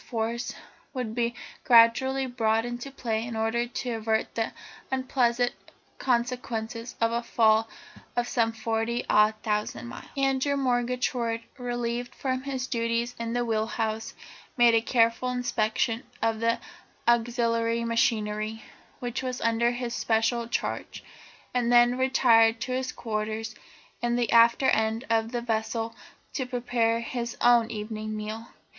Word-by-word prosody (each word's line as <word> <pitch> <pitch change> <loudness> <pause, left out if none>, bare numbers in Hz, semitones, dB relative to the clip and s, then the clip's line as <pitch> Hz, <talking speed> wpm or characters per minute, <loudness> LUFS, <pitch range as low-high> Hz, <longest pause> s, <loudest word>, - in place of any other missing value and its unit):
Force" 230 +1 -3 0.4
would 245 -4 -3
be 235 0 -1 0.3
gradually 260 +3 +5
brought 225 -3 +1
into 240 +2 -5
play 225 -5 -2
in 235 -1 -5
order 225 +2 0
to 245 +1 -4
avert 220 -1 -1
the 225 -1 -1 0.4
unpleasant 245 -2 +1 0.5
consequences 235 -2 -2
of 230 0 +2
a 235 0 0
fall 225 -1 +3 0.5
of 240 0 0
some 230 -2 +1
forty 225 +1 -2
odd 210 +1 +4
thousand 210 - -2
miles. 120 0 -9
Andrew 270 +1 +1
Murgatroyd, 245 -2 0 0.2
relieved 240 0 -3
from 260 -1 -2
his 265 -2 -3
duties 235 0 -1
in 230 0 -3
the 245 0 0
wheel 220 -1 0
house, 220 0 -3 0.4
made 240 -1 +6
a 225 - +4
careful 230 +1 +2
inspection 235 -2 0 0.2
of 225 -1 0
the 230 0 +2 0.5
auxiliary 235 -1 +2
machinery, 220 -1 0 0.3
which 245 -1 -3
was 255 -1 -3
under 230 +1 +2
his 240 0 -3
special 230 +1 +1
charge, - - -3 0.5
and 245 -1 +1
then 240 0 +6
retired 235 -3 +4
to 255 - -3
his 255 0 -1
quarters 220 0 -3 0.5
in 240 0 +1
the 240 -1 0
after 235 +3 +6
end 220 +2 +1
of 225 0 +1
the 240 -1 -2
vessel 225 0 -2 0.4
to 260 -4 -2
prepare 240 -2 0
his 235 0 -4
own 240 -1 +5
evening 215 0 -4
meal. 215 +2 -5
235 Hz, 140 wpm, -27 LUFS, 225-245 Hz, 0.5 s, made